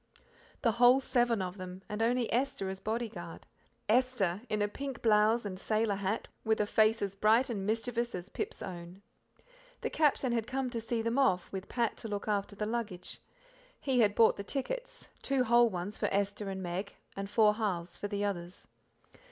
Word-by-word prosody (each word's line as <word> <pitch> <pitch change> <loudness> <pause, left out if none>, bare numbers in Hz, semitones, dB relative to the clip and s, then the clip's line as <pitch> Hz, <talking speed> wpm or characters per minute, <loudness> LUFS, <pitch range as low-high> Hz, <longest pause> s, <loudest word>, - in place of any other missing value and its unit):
The 230 - +4
whole 245 +3 +6
seven 240 -5 +1
of 185 +1 -6
them, 185 +1 -7
and 210 +1 -4
only 240 0 +1
Esther 245 -6 0
as 190 0 -5
bodyguard 225 +1 -4 0.4
Esther 220 -5 +2
in 210 -1 +1
a - - +2
pink 270 +3 -6
blouse 220 +1 +4
an 190 -2 -4
sailor 215 +2 +1
hat, 200 +2 -2 0.2
with 220 -1 +1
a 210 - +3
face 215 +1 +3
as 195 -1 -2
bright 220 +5 +3
and 200 -3 -3
mischievous 235 +1 -1
as 180 0 -6
Pip's - - -4
own. 180 +1 -8 0.8
The - - -2
Captain 285 -4 +2
had 230 -1 0
come 260 -1 -2
to 230 -2 -3
see 230 0 -2
them 230 +4 +1
off, 185 -9 +2
with 190 -1 -6
Pat 235 -2 0
to 225 - -6
look 205 -1 -4
after 205 -1 -1
the 210 - -2
luggage. 215 -5 -4 0.6
He 265 -3 +1
had 210 -3 +4
bought 225 - +5
the 200 - -4
tickets - - -4
two 275 -2 +1
whole 240 0 +5
ones 185 +2 -4
for - - +1
Esther 200 +1 -1
and 190 -1 -4
Meg, 180 +3 -4 0.2
and 195 0 -4
four 215 -1 +5
halves 190 -6 -2
for 205 - -4
the 205 0 -1
others. 175 -3 -4
215 Hz, 190 wpm, -32 LUFS, 195-235 Hz, 0.8 s, whole